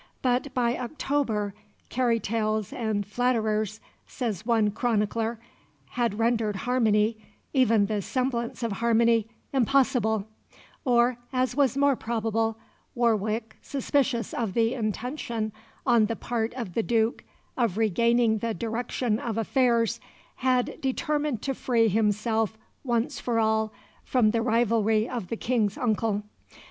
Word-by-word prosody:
But 255 +2 +1
by 240 -1 +2
October 245 -6 -1 0.4
"carry 240 -2 +1
tales 215 -1 -1
and 215 -3 -1
flatterers," 215 -2 0 0.3
says 225 - -4
one 220 -3 +3
chronicler, 225 0 0 0.5
had 235 -4 -1
rendered 225 -2 +1
harmony 220 -3 +2 0.4
even 230 -6 +4
the 210 0 -1
semblance 245 +1 -2
of 230 - -1
harmony 230 +1 +2 0.2
impossible; 240 -5 +2 0.6
or, 245 -1 +3
as 255 -1 0
was 275 -3 +2
more 280 -1 +4
probable, 225 -1 -1 0.4
Warwick, 220 -1 0
suspicious 270 -4 0
of 220 -6 -2
the 230 +1 +2
intention 230 0 -3 0.3
on 235 -4 +4
the 230 - -2
part 230 0 -2
of 230 -9 -5
the 230 - +1
Duke 225 0 +1 0.3
of 230 -6 0
regaining 225 +1 +3
the 230 0 -2
direction 230 0 -1
of 230 -3 -3
affairs, 235 0 +2 0.4
had 255 -1 0
determined 295 -2 -1
to 270 - -1
free 235 -3 +2
himself 220 +1 +1 0.3
once 245 +2 -1
for 235 -2 -1
all 220 0 +1 0.3
from 235 -5 +3
the 230 0 +1
rivalry 225 -1 +2
of 240 -8 -4
the 230 - -3
King's 220 -5 0
uncle. 220 -4 0
230 Hz, 125 wpm, -27 LUFS, 220-245 Hz, 0.6 s, even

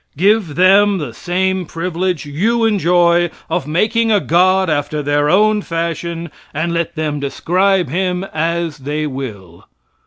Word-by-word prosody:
Give 195 -3 +2
them 195 +3 +4
the 145 -9 -5
same 185 +3 -1
privilege 175 -1 -3
you 220 +11 0
enjoy 175 -4 +3 0.2
of 140 - -1
making 225 +8 +1
a 210 - +4
god 185 +2 +2
after 150 -1 -1
their 145 +1 +1
own 210 +3 +3
fashion, 170 -1 -4 0.2
and 170 +3 -1
let 170 0 -2
them 155 -2 -2
describe 180 +6 +1
him 180 +4 -1
as 165 -1 -2
they 150 +3 -3
will. 105 - -7
170 Hz, 135 wpm, -17 LUFS, 150-190 Hz, 0.2 s, them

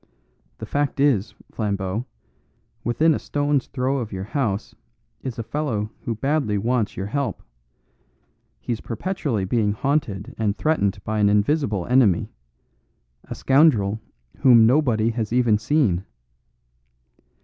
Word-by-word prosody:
The - - -6
fact 145 -1 -1
is, 130 -8 +2 0.2
Flambeau, 100 +2 -2 0.8
within 155 +7 +3
a - - -2
stone's 145 -2 0
throw 135 +1 -1
of 115 -4 -5
your 95 -1 -4
house 110 -3 -2 0.5
is 130 -3 -5
a 115 - -3
fellow 115 -4 -2
who 115 - -1
badly 135 -3 0
wants 115 +1 -1
your 95 - -3
help; 120 -1 -3 1.2
he's 115 -2 -4
perpetually 125 - -2
being 105 0 +1
haunted 110 -5 -2
and 105 -2 0
threatened 100 -11 0
by 110 0 -2
an 100 -1 +4
invisible 105 - +1
enemy 120 -8 +3 0.9
a - - -7
scoundrel 120 -8 +3 0.4
whom 120 -5 +7
nobody 115 -4 +3
has 110 -2 -3
even 120 -4 +3
seen." 110 - +1
115 Hz, 125 wpm, -23 LUFS, 105-140 Hz, 1.2 s, whom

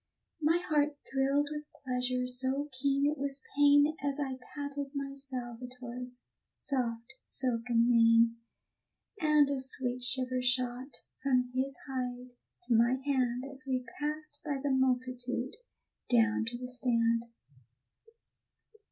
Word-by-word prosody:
My 315 +3 +4
heart 300 -4 +1
thrilled 275 +2 +1
with 300 0 -6 0.2
pleasure 250 0 0
so 260 +3 0
keen 275 +2 +1
it 295 0 +1
was 275 0 -1
pain 290 +1 +5
As 285 0 -1
I 270 -2 -1 0.2
patted 285 -1 -3
my 275 -1 -3
Salvator's 250 -1 -6 0.3
soft 240 -2 -1
silken 235 -2 +1
mane; 230 -1 +5 0.8
And 300 -3 +5
a 275 - 0
sweet 255 -1 -2
shiver 255 0 +1
shot 250 +1 -1 0.2
from 250 -2 +2
his 265 +1 -1
hide 250 -1 -4 0.3
to 240 0 +1
my 235 +3 +4
hand 255 -3 +1
As 270 -2 -4
we 255 -1 -1
passed 300 0 -2
by 295 -3 -2
the 280 +1 -1
multitude 255 -1 0 0.5
down 225 -2 +3
to 240 +1 -3
the 250 +1 -6
stand. 235 -2 +1
255 Hz, 125 wpm, -31 LUFS, 245-280 Hz, 0.8 s, pain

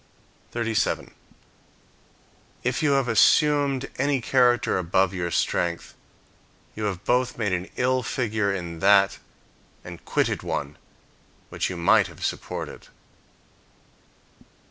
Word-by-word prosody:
37. 115 -2 -1 1.5
If 125 +1 -1
you 150 -2 +3
have 135 -2 +1
assumed 140 +2 +3
any 140 0 +1
character 120 -4 +2
above 95 +2 +1
your 90 -2 -2
strength, 85 0 -1 0.8
you 110 - -3
have 95 -2 -3
both 125 +1 0
made 105 -5 -1
an 90 +1 -3
ill 130 +1 +1
figure 110 -4 -1
in 85 -4 -5
that 100 +1 +4 0.6
and 85 -1 -10
quitted - - 0
one 70 +1 -4 0.7
which - - -2
you 90 - -5
might 85 - +4
have - - -7
supported. - - -5
110 Hz, 110 wpm, -24 LUFS, 90-130 Hz, 1.5 s, that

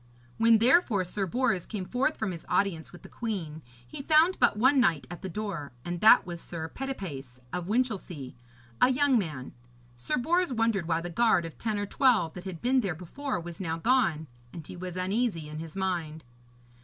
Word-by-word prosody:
When, 230 0 +6
therefore, 235 - +4
Sir 195 +2 -3
Bors 215 -3 0
came 200 -4 -4
forth 250 +10 0
from 220 -3 -2
his 170 -2 -8
audience 180 -5 0
with 175 - -14
the - - -10
queen, 175 -10 -5 0.3
he 120 - -7
found 315 +5 +4
but 240 -4 +3
one 260 +5 +4
knight 170 - +2
at 175 - -8
the 190 - -5
door, 180 -8 -5
and 175 0 -4
that 220 - +7
was 170 -1 -6
Sir 160 -2 -6
Petipace 160 - -6
of 180 -1 -3
Winchelsea, 200 - -2 0.5
a - - +7
young 270 -2 +3
man. 155 -9 -5 0.4
Sir 120 - -2
Bors 345 +6 +1
wondered 225 -7 0
why 165 -1 +1
the 175 +1 -6
guard 220 -4 +3
of 165 - -8
ten 220 -2 -1
or 205 - -1
twelve 215 - +2
that 180 - -9
had 180 -4 -7
been 255 +1 +3
there 185 -7 -2
before 255 - -4
was 170 +2 -8
now 165 -3 -2
gone, 170 -7 +2 0.3
and 165 -3 -9
he - - -9
was 180 0 -6
uneasy 185 -3 -1
in 155 +1 -7
his 165 +1 -8
mind. 170 -5 -2
190 Hz, 195 wpm, -28 LUFS, 165-240 Hz, 0.5 s, that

